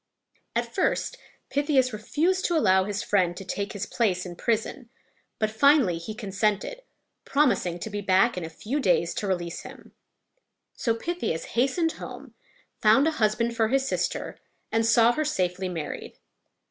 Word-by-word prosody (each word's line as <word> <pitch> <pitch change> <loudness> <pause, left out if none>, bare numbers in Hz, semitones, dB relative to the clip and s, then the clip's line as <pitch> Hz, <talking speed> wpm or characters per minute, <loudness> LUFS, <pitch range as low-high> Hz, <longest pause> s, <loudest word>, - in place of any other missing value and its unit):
At - - -1
first - - 0 0.4
Pythias 280 -4 +2
refused 330 - 0
to 345 - +2
allow 190 -9 +4
his 205 0 -3
friend 180 -3 +1
to 195 - -7
take 200 +2 -3
his 205 -2 -3
place 190 -6 0
in 175 -1 -7
prison, 230 +3 -2 0.5
but 215 -1 0
finally 235 - +4
he 215 +6 -7
consented, 210 - -1 0.4
promising 250 - +1
to 195 - -6
be 205 0 -3
back 195 +4 +3
in 180 - -4
a 160 - -5
few 225 - -3
days 180 -8 +2
to 205 - -3
release 175 -3 -2
him. - - -12 0.8
So 230 -2 0
Pythias 230 - -3
hastened 275 +7 +2
home, - - -9 0.5
found 225 +8 +5
a - - +3
husband 230 +2 +1
for 225 -1 +2
his 270 +3 +1
sister, - - -2 0.3
and 225 0 +2
saw 230 +1 +5
her 310 +5 -1
safely 185 -9 -1
married. 165 -4 -6
215 Hz, 160 wpm, -26 LUFS, 185-265 Hz, 0.8 s, found